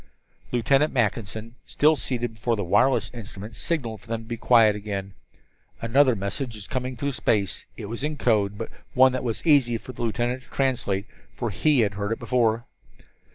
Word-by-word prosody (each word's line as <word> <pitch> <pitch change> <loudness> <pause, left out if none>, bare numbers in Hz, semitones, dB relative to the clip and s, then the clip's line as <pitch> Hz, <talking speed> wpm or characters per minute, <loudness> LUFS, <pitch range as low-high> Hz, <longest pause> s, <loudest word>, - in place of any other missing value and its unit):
Lieutenant 135 +5 +3
Mackinson, 110 -2 -1
still 155 +2 +3
seated 120 -4 -2
before 115 +2 -1
the 100 - -2
wireless 115 +4 +2
instrument, 110 -2 -8
signaled 120 -10 -2
them 115 -1 -5
for 120 - -3
quiet 115 -2 +5
again. 100 -2 -5 0.7
Another 130 +2 +4
message 110 +5 -4
was 105 -2 -7
coming 130 +1 -3
through 140 +4 -1
space. 105 -6 0
It 110 - -6
was 115 +5 -6
in 150 0 -2
code, 105 -6 +1
but 115 - -5
was - - -21 0.2
one 130 0 +7
that 130 - -3
was 115 +3 -3
easy 135 -7 +4
for 130 - -10
the 120 - -8
lieutenant 120 +2 -1
to - - -22
translate, 120 -7 0 0.3
for 120 -3 -2
he 140 - +3
had 105 -2 +1
heard 100 +1 -3
it 115 - 0
before. 115 -2 +1
115 Hz, 180 wpm, -25 LUFS, 105-130 Hz, 0.7 s, one